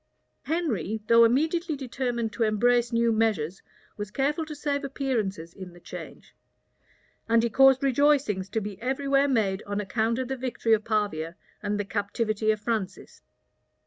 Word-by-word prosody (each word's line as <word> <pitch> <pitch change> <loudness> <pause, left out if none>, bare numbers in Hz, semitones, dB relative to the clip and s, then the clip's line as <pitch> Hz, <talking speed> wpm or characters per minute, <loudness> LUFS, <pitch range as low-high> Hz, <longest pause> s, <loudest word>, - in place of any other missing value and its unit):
Henry, 230 - -1
though 230 +1 +6
immediately 315 +7 +2
determined 245 -4 -3
to 205 - -7
embrace 235 +2 +2
new 230 0 +2
measures, 205 -6 0 0.4
was 205 -1 -5
careful 290 +7 -1
to 305 - -6
save 285 0 -2
appearances 220 - -2
in 185 -2 -10
the 175 - -15
change; - - -10 0.9
and 230 0 +4
he 235 - 0
caused 270 +2 +5
rejoicings 270 -8 +2
to 220 - -1
be 205 -1 -7
every 265 +3 -2
where 275 +1 +4
made 210 -7 +1
on 205 0 -2
account 220 +3 0
of 260 -1 -2
the 265 - -2
victory 245 -3 0
of 215 -1 +2
Pavia 200 -7 -1 0.3
and 205 0 -2
the 205 - -1
captivity 215 +1 -1
of 215 -1 +2
Francis. 210 -4 -4
230 Hz, 160 wpm, -26 LUFS, 205-270 Hz, 0.9 s, though